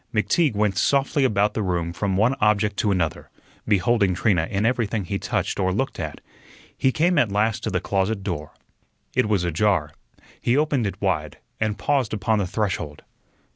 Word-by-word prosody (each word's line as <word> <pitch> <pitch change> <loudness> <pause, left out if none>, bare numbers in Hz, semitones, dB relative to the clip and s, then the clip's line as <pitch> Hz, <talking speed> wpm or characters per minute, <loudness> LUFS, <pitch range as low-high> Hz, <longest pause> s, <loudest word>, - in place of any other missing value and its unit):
McTeague 115 - +1
went 105 -2 +1
softly 140 +1 +2
about 105 -4 +2
the 110 - -2
room 85 -3 -1
from 95 +1 -1
one 115 +6 +3
object 105 -1 +2
to 105 - +1
another, 90 -5 -1 0.4
beholding 100 -1 +2
Trina 90 -4 +1
in 100 +2 0
everything 115 -4 0
he 100 +3 -3
touched - - -2
or 95 -1 +1
looked 130 +8 -2
at. 80 -3 -5 0.5
He 130 - +2
came 165 +3 +2
at 115 -7 +2
last 105 +2 +1
to - - 0
the - - 0
closet 100 +1 -1
door. 85 -6 -4 0.6
It 105 - +1
was 100 -4 +2
ajar. 85 -2 +1 0.5
He 120 +3 +2
opened 145 -7 +1
it 100 - -6
wide, 80 -7 -1 0.2
and 110 -1 -1
paused 125 +2 0
upon 110 +2 +1
the 95 - -1
threshold. 90 -8 -3
105 Hz, 175 wpm, -23 LUFS, 95-115 Hz, 0.6 s, one